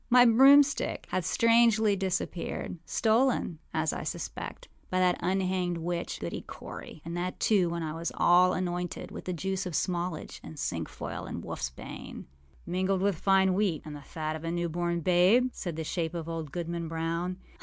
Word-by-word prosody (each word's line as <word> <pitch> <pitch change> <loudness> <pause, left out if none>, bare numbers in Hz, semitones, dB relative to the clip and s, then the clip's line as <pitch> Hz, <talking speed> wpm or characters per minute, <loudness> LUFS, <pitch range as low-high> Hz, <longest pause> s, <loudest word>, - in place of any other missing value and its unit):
âmy 245 -2 +7
broomstick 275 +2 +5
hath 185 - 0
strangely 230 0 +4
disappeared, 185 -2 -3
stolen, 225 -7 +2
as 160 -1 0
I - - -4
suspect, - - -5 0.2
by 185 - -1
that 180 -1 +3
unhanged 185 -1 0
witch, 170 +1 -3
Goody 85 - -4
Cory, 155 - -10
and 170 +1 -4
that, 180 +1 -3
too, 190 -5 +3
when 170 0 -3
I 155 -1 -3
was 165 +1 -3
all 180 +1 +5
anointed 180 -1 -3
with - - -8
the 185 - -2
juice 190 +2 -2
of 180 - -5
smallage, 175 -3 -2
and 160 - -10
cinquefoil, 80 - -4
and - - -5
wolfâs 65 0 -4
bane.â - - -8 0.4
âMingled 185 +2 0
with 200 -1 +2
fine 190 -1 +4
wheat 185 -5 0
and 150 -1 -7
the 145 - -9
fat 155 +2 -4
of 160 - -7
a 165 - -2
new 170 0 -1
born 170 +1 -1
babe,â 185 +9 +4
said 175 -4 -5
the 160 - -3
shape 165 +1 -2
of 165 -1 -4
old 165 -3 -4
Goodman 170 0 -3
Brown. 165 +3 -2
175 Hz, 175 wpm, -29 LUFS, 165-190 Hz, 0.4 s, âmy